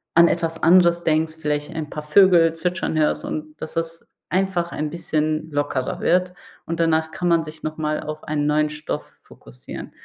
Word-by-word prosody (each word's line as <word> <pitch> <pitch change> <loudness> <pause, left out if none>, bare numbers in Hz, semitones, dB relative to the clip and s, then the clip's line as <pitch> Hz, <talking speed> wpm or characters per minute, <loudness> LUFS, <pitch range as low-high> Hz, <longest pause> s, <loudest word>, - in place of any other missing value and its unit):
an 170 +1 +8
etwas 165 -1 -2
anderes 170 0 +5
denkst, 155 0 +1
vielleicht 150 +1 -2
ein 155 -2 -4
paar 150 - -6
Vögel 165 0 +5
zwitschern 180 -1 -2
hörst 155 -1 +1
und 155 0 -6
dass 155 - -6
das 165 0 -4 0.2
einfach 180 -1 0
ein 150 0 -3
bisschen 155 -1 -2
lockerer 145 +3 -2
wird. 180 0 +2 0.3
Und 165 0 -4
danach 160 -1 +2
kann 180 - -2
man 170 -1 +3
sich 155 0 -11
noch 155 0 -4
mal 155 -1 -1
auf 155 0 -6
einen 150 -1 -1
neuen 150 0 +2
Stoff 150 0 -6
fokussieren. 60 0 -11
160 Hz, 180 wpm, -22 LUFS, 150-170 Hz, 0.3 s, an